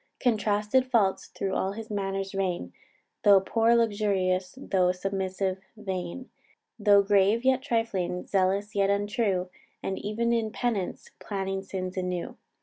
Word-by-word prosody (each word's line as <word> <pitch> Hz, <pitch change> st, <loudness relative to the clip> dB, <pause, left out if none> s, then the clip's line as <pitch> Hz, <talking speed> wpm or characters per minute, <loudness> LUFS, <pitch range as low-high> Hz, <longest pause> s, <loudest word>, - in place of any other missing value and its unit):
Contrasted 220 Hz, +2 st, +1 dB
faults 210 Hz, -6 st, +2 dB
thro' 195 Hz, -1 st, -3 dB
all 190 Hz, +1 st, 0 dB
his 225 Hz, +1 st, -8 dB
manners 195 Hz, -1 st, -2 dB
rein; 185 Hz, -, -2 dB, 0.5 s
Though 200 Hz, -1 st, +8 dB
poor, 225 Hz, +4 st, +2 dB
luxurious; 200 Hz, -3 st, +1 dB
though 185 Hz, -8 st, +2 dB
submissive, 190 Hz, 0 st, -2 dB, 0.2 s
vain; 190 Hz, +4 st, -5 dB, 0.5 s
Though 205 Hz, -1 st, +6 dB
grave, 205 Hz, +4 st, +3 dB
yet 260 Hz, -1 st, +4 dB
trifling; 225 Hz, -8 st, -1 dB
zealous, 195 Hz, +2 st, +1 dB
yet 200 Hz, -1 st, +2 dB
untrue; 200 Hz, -2 st, 0 dB, 0.3 s
And 190 Hz, -, -3 dB
e'en 235 Hz, +3 st, 0 dB
in 225 Hz, -2 st, 0 dB
penance 215 Hz, -7 st, -2 dB
planning 195 Hz, -1 st, -3 dB
sins 185 Hz, -1 st, -5 dB
anew. 180 Hz, -1 st, -3 dB
200 Hz, 130 wpm, -27 LUFS, 190-220 Hz, 0.5 s, Though